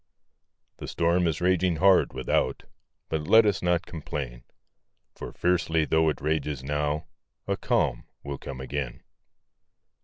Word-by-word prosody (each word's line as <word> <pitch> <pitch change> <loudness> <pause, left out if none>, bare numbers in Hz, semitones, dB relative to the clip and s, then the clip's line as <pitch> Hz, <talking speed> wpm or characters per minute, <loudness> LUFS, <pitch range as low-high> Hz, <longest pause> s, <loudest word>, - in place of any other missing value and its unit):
The - - -7
storm 85 +1 +1
is 80 0 -2
raging 90 -1 +2
hard, 95 +4 +4
without; 65 -1 -1 0.4
But 75 -1 -3
let 110 0 +7
us 105 -2 +1
not 90 -1 +1
complain, 70 -6 -6 0.7
For - - -8
fiercely 85 -3 +1
tho' 80 0 +3
it 75 - -4
rages 75 -3 -1
now, 75 +2 -1 0.4
A - - 0
calm - - 0 0.2
will 70 -1 -5
come 65 -2 -7
again. 65 -2 -4
80 Hz, 130 wpm, -27 LUFS, 70-90 Hz, 0.7 s, let